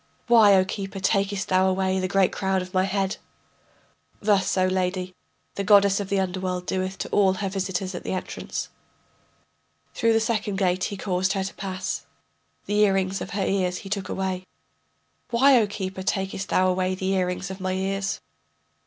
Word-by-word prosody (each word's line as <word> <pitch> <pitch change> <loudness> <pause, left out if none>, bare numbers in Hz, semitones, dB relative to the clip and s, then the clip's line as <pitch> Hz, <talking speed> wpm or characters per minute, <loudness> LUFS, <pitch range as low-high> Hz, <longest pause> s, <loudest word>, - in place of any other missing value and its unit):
Why, 225 -4 +7
O 185 -1 +4
keeper, 195 0 -5
takest 195 0 0
thou 185 0 +4
away 190 0 0
the 185 - -1
great 195 0 +3
crown 190 -1 0
of 185 - -12
my 185 0 +3
head? 195 +1 -1 1.0
Thus, 200 -3 +2
O 185 - +4
lady, 185 0 -1 0.4
the 200 - -3
goddess 200 -1 +5
of 200 -1 -4
the 200 -1 +1
underworld 185 -1 -2
doeth 185 +1 -2
to - - -5
all 195 -2 +3
her 195 +1 -3
visitors 190 -1 -2
at 175 - -6
the - - -4
entrance. 185 - -4 1.2
Through 230 0 +2
the 225 - +4
second 220 -3 -1
gate 185 -1 +1
he 200 - -4
caused 190 0 0
her 195 -2 -1
to 195 - -5
pass, 190 -1 -4 0.6
The 210 +1 0
earrings 195 -2 +2
of - - -5
her 195 - +1
ears 185 -2 0
he - - -7
took 195 -2 -3
away. 185 -1 -3 0.8
Why, 255 +1 +5
O 210 - +1
keeper, 190 -2 -5
takest 195 0 -2
thou 185 - +3
away 185 0 0
the 190 +1 -1
earrings 185 0 -1
of 190 - -7
my 185 0 -1
ears? 195 +1 -2
190 Hz, 180 wpm, -25 LUFS, 185-200 Hz, 1.2 s, Why